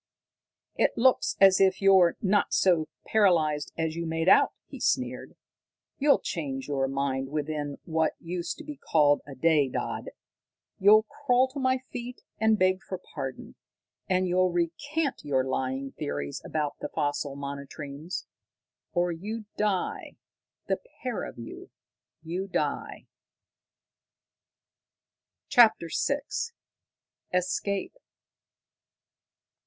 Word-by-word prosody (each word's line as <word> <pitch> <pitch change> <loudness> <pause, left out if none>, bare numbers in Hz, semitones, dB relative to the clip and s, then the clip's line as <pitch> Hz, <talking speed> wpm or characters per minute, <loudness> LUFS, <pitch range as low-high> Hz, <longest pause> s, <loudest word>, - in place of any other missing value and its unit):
"It - - +1
looks 255 +2 +3
as 195 -1 +7
if 190 -1 +4
you're 190 -3 +5
not 205 +1 +2
so 170 -5 +3 0.2
paralysed 160 -8 +2
as 160 -1 -1
you 170 0 -3
made 165 +1 -1
out," - - +6
he - - -10
sneered. - - -1 0.6
"You'll 285 0 +5
change 135 -6 -4
your 135 -2 0
mind 135 -1 -1
within 150 -1 -3
what 160 -1 +1
used 170 0 -4
to - - -9
be 300 -2 -8
called 145 - +3
a 140 - -8
day, 150 -1 +3
Dodd. - - -3 0.7
You'll 210 +3 +7
crawl 255 +2 +1
to 280 +2 -6
my 260 0 +2
feet 245 0 -7 0.2
and 220 0 +4
beg 185 0 +2
for 185 - -6 0.2
pardon. 135 -3 -6 0.6
And 185 0 +2
you'll 180 0 +2
recant 270 - -1
your 135 -3 +1
lying 130 +1 -2
theories 70 0 -4
about 150 -2 -3
the - - -5
fossil 145 -2 -2
monotremes, 140 +3 -6 0.7
or 175 0 +1
you 210 +6 -5
die 205 -3 -1 0.5
the - - 0 0.2
pair 250 -4 -2
of - - -9
you 115 -1 -9 0.5
you 180 +4 -3
die!" - - -2 2.4
CHAPTER 220 - +5
VI 280 0 +1 1.1
_Escape! 185 +2 -1
170 Hz, 115 wpm, -28 LUFS, 145-200 Hz, 2.4 s, as